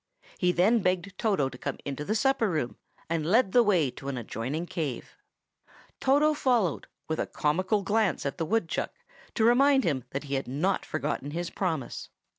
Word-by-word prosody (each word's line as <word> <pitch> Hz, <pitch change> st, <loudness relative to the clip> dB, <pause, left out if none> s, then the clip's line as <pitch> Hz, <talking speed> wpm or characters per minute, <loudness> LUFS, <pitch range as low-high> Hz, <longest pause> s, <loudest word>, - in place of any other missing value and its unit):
He 180 Hz, -1 st, +3 dB
then 200 Hz, +7 st, +4 dB
begged 185 Hz, 0 st, -1 dB
Toto 195 Hz, -11 st, +2 dB
to 125 Hz, -1 st, -8 dB
come -, -, -3 dB
into 140 Hz, +1 st, -4 dB
the 210 Hz, +8 st, -1 dB
supper 265 Hz, -2 st, +2 dB
room, 155 Hz, -8 st, -2 dB, 0.3 s
and 165 Hz, -1 st, -1 dB
led 195 Hz, +5 st, +3 dB
the 245 Hz, -, +6 dB
way 180 Hz, -, +3 dB
to 135 Hz, -, -10 dB
an 140 Hz, -2 st, -2 dB
adjoining 125 Hz, +8 st, -3 dB
cave. 155 Hz, -8 st, -4 dB, 0.8 s
Toto 290 Hz, +3 st, +4 dB
followed, 240 Hz, -, +1 dB, 0.2 s
with 160 Hz, -, -2 dB
a -, -, -1 dB
comical 185 Hz, +7 st, 0 dB
glance 210 Hz, -6 st, +1 dB
at 140 Hz, -, -3 dB
the 165 Hz, -, 0 dB
woodchuck, 215 Hz, -5 st, -1 dB, 0.4 s
to 220 Hz, -, +3 dB
remind 265 Hz, +3 st, +5 dB
him 140 Hz, -6 st, 0 dB
that 135 Hz, -, -4 dB
he 140 Hz, -1 st, -6 dB
had 135 Hz, 0 st, -1 dB
not 160 Hz, +10 st, -1 dB
forgotten 145 Hz, -2 st, -2 dB
his 170 Hz, +3 st, -4 dB
promise. 165 Hz, -8 st, -3 dB
180 Hz, 180 wpm, -28 LUFS, 145-220 Hz, 0.8 s, the